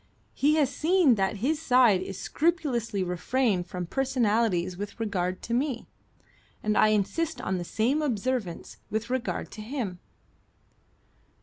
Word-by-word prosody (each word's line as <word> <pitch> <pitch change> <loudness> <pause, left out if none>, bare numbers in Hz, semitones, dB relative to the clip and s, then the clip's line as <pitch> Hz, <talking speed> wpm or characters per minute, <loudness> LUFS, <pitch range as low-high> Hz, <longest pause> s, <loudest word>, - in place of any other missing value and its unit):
He 295 +3 +3
has 290 -4 +2
seen 335 -4 +4
that 195 -1 0
his 310 +2 +1
side 245 - +5
has 195 0 -6
scrupulously 265 - 0
refrained 185 +2 0
from 180 0 -4
personalities 225 -7 +1
with 205 +3 -7
regard 185 -4 -2
to 230 - -3
me, 255 -1 -1 0.8
and 215 0 +1
I - - +5
insist 215 +11 0
on 190 -1 -2
the - - -3
same 240 - 0
observance 245 - -2
with 220 +3 -3
regard 255 -1 -2
to 215 - -8
him." 215 -6 -4
230 Hz, 135 wpm, -27 LUFS, 195-270 Hz, 0.8 s, side